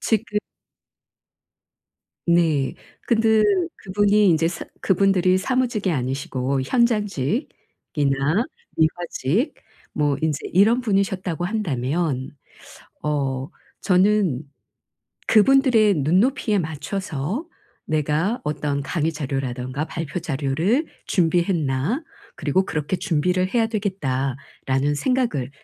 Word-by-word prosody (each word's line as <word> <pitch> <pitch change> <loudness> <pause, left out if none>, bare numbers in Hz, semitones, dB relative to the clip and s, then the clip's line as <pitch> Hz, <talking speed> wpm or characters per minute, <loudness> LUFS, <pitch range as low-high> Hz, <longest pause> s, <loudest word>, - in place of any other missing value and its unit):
지금 220 -1 0 1.9
네. 165 -5 +2 0.3
근데 220 -1 +3 0.3
그분이 205 +1 +2
인제 165 -1 +3
사 175 - -6 0.2
그분들이 190 -1 +3
사무직이 240 -2 0
아니시고 135 -1 -1
현장직이나 210 - +1 1.3
미화직 170 - 0 0.4
뭐 145 -2 +1
인제 155 -2 0
이런 215 +7 +4
분이셨다고 190 -5 -1
한다면 150 - -1 0.7
어 135 -3 -1 0.3
저는 185 -6 +2 0.8
'그분들의 225 -2 +5
눈높이에 200 - +2
맞춰서 170 - -3 0.4
내가 155 - 0
어떤 150 -1 -1
강의 160 +2 -1
자료라든가 135 -1 -3
발표 165 +2 -4
자료를 160 - 0 0.2
준비했나? 170 - +1 0.3
그리고 190 - +1
그렇게 155 +1 -2
준비를 180 +1 0
해야 230 -2 +3
되겠다.'라는 140 - -2
생각을 195 - 0
175 Hz, 225 characters per minute, -22 LUFS, 145-210 Hz, 1.9 s, 그분들의